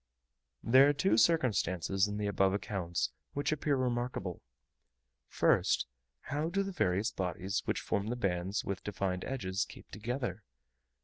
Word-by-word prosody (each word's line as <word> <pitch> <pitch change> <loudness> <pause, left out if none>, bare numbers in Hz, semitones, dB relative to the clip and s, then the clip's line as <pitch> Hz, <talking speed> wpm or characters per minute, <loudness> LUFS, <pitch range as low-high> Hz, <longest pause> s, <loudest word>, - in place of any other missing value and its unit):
There 130 +4 +7
are - - +3
two 165 +7 +2
circumstances 100 - +2
in 105 0 -4
the 105 - -2
above 95 -1 +2
accounts 95 -4 -2 0.2
which 145 +1 -1
appear 150 -1 +1
remarkable: 120 -7 -2 0.9
first, - - +2 0.4
how 150 +3 -2
do 195 +3 +1
the 195 - -4
various 105 - +1
bodies 95 +2 -2
which - - 0
form 100 +1 -1
the 120 - -1
bands 95 -2 -1
with 95 -1 -3
defined 95 -2 -2
edges 95 -7 -1
keep - - -12
together? 115 -2 -3
105 Hz, 140 wpm, -32 LUFS, 95-130 Hz, 0.9 s, There